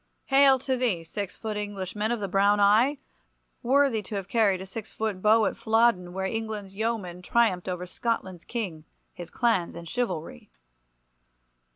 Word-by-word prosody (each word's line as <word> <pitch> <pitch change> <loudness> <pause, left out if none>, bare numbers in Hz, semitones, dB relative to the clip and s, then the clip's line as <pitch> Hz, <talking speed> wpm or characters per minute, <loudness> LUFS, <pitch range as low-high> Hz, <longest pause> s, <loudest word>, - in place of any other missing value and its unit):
Hail 270 0 +5
to 260 +1 -1
thee, 225 -10 0
six 200 +3 -5
foot 215 -2 -5
Englishman 205 +1 -3
of 240 - -1
the 200 - -3
brown 200 +2 +3
eye, 220 +8 +4 0.6
worthy 265 -2 +3
to 205 +1 -7
have 195 -2 -4
carried 205 -4 +2
a 190 - -7
six 210 +3 -8
foot 215 -4 -3
bow 215 +2 +5
at - - -1
Flodden, 220 -5 +2
where 190 +1 -3
England's 215 -1 -4
yeomen 200 -5 -3
triumphed 190 -3 +1
over 180 0 -3
Scotland's 185 -3 -3
King, 190 -10 -5 0.3
his 175 -2 -9
clans 225 -10 0
and 170 0 -8
chivalry. 175 - -4
210 Hz, 160 wpm, -27 LUFS, 185-230 Hz, 0.6 s, Hail